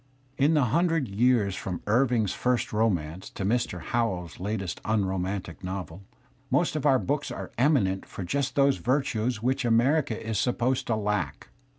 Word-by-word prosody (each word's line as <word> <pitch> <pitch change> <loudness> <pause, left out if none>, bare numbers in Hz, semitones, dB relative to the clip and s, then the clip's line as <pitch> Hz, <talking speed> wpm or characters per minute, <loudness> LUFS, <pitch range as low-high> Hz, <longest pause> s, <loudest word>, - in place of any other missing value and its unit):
In 145 +4 +3
the 150 - +4
himdred 160 - +1
years 115 -4 +3
from 90 -2 -5
Irving's 115 -2 +2
first 125 -3 0
romance 95 -6 0
to 95 - -5
Mr. 110 -4 0
Howells's 95 -8 -2
latest 95 -2 -3
unromantic 95 -4 -2
novel, 90 -1 -5 0.5
most - - +1
of 150 -1 +1
our 135 -2 +5
books 145 +3 -1
are - - -6
eminent 120 -9 +2
for 95 - -6
just 135 +8 -1
those 140 -1 +4
virtues 125 -3 0
which 130 +2 +1
America 120 +3 +2
jj - - -8
is 110 -2 -2
supposed 125 +1 0
to 115 - +1
lack. 105 -8 -2
115 Hz, 160 wpm, -27 LUFS, 95-130 Hz, 0.5 s, our